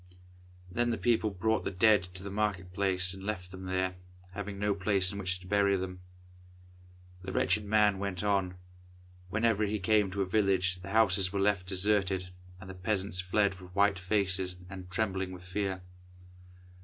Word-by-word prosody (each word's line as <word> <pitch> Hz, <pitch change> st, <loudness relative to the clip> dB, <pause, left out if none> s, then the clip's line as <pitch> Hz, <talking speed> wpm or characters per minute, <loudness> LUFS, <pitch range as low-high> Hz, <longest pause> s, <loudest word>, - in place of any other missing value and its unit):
Then 120 Hz, +5 st, +1 dB
the 115 Hz, -, 0 dB
people 115 Hz, -2 st, +2 dB
brought 110 Hz, +3 st, 0 dB
the -, -, -1 dB
dead 105 Hz, +2 st, +4 dB
to 95 Hz, -, -4 dB
the 100 Hz, -, -6 dB
market 95 Hz, -3 st, -2 dB
place 95 Hz, -1 st, +1 dB
and 95 Hz, -, -10 dB
left 95 Hz, -3 st, -4 dB
them 95 Hz, 0 st, -8 dB
there, 95 Hz, 0 st, -1 dB, 0.3 s
having 100 Hz, +1 st, -6 dB
no 105 Hz, +1 st, +1 dB
place 95 Hz, -1 st, +1 dB
in 100 Hz, -, -6 dB
which 90 Hz, -1 st, -1 dB
to -, -, -13 dB
bury 100 Hz, 0 st, +3 dB
them. 90 Hz, 0 st, -5 dB, 1.2 s
The 95 Hz, +1 st, -6 dB
wretched 105 Hz, +2 st, +2 dB
man 105 Hz, -1 st, +3 dB
went 100 Hz, -2 st, -3 dB
on. 95 Hz, -3 st, +1 dB, 0.7 s
Whenever 110 Hz, +1 st, +2 dB
he 105 Hz, +1 st, -1 dB
came 105 Hz, +1 st, +2 dB
to 100 Hz, +1 st, -1 dB
a -, -, -2 dB
village 95 Hz, -2 st, +1 dB
the 95 Hz, -, -8 dB
houses 100 Hz, -3 st, +3 dB
were 100 Hz, -, -2 dB
left 95 Hz, -2 st, +1 dB
deserted, 95 Hz, -1 st, +1 dB, 0.3 s
and 95 Hz, -, -11 dB
the 95 Hz, -, -7 dB
peasants 95 Hz, -1 st, -1 dB
fled 95 Hz, 0 st, +1 dB
with 90 Hz, 0 st, -13 dB
white 100 Hz, -1 st, +3 dB
faces, 95 Hz, -1 st, 0 dB, 0.2 s
and 95 Hz, -1 st, -8 dB
trembling 95 Hz, -1 st, -1 dB
with 90 Hz, -1 st, -10 dB
fear. 95 Hz, 0 st, -3 dB
95 Hz, 175 wpm, -31 LUFS, 90-105 Hz, 1.2 s, dead